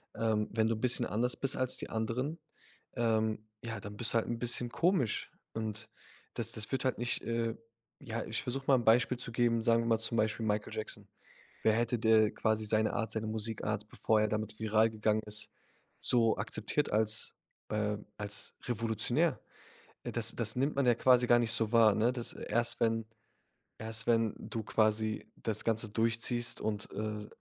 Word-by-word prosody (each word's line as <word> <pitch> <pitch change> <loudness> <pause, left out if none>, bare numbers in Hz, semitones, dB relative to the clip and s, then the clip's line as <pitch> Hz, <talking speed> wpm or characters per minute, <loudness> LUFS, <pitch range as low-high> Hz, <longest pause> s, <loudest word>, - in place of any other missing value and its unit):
Ähm, 110 -1 0
wenn 110 0 +1
du 115 - +1
'n 110 - -8
bisschen 125 -1 +3
anders 120 +4 0
bist 135 - 0
als 130 -1 0
die - - -5
anderen, 125 +8 -2 0.6
ähm, 110 -2 0 0.2
ja, 115 -2 -5
dann 100 +1 -8
bist 115 - +2
du - - -2
halt 115 - 0
'n 120 - -2
bisschen 120 0 +1
komisch. 155 - 0 0.2
Und 110 0 -4 0.5
das 115 -1 -2
das 110 -2 -3
wird 130 - 0
halt 130 - 0
nicht, 120 +1 -1
äh 115 0 -1 0.5
ja, 115 -4 -4
ich 110 -1 -2
versuch 135 +2 -4
mal 135 - +6
'n 120 -2 -1
Beispiel 120 +2 +4
zu 120 -1 -4
geben, 115 -1 +1
sagen 115 0 +3
wir 115 - -3
mal 115 -1 +2
zum 115 +1 -1
Beispiel 110 +1 0
Michael 105 -1 -1
Jackson. 105 -1 -4 0.6
Wer 110 - +4
hätte 120 +1 0
da 110 -1 +4
quasi 110 -1 0
seine 110 +1 +2
Art, 110 0 -2
seine 110 0 -2
Musikart, 110 -1 -3
bevor 110 0 +1
er 110 - +2
damit 110 0 -3
viral 110 +1 +3
gegangen 110 0 0
ist, 105 0 +1 0.5
so 115 -3 +3
akzeptiert 110 +7 -1
als, 110 0 +2 0.3
äh, 105 -1 -1 0.2
als 105 0 0
revolutionär? 115 -2 0 0.6
Äh, - - -4
das 110 -2 +2
das 110 -2 +1
nimmt 135 +4 0
man 140 -1 +1
ja 120 - +5
quasi 125 +1 +4
gar 120 0 +5
nicht 115 -1 +2
so 115 -2 +1
wahr, 115 -3 +5
ne? 115 +4 +2
Das 120 -2 -2
erst 120 +2 0
wenn 115 -1 +1 0.7
erst 110 +1 -1
wenn 115 -2 +2
du 115 - -5
quasi 110 0 +1
das 110 -2 0
Ganze 110 -1 +2
durchziehst 115 +2 +1
und, 105 -1 -2
äh, 105 0 -4
110 Hz, 185 wpm, -32 LUFS, 110-120 Hz, 0.7 s, mal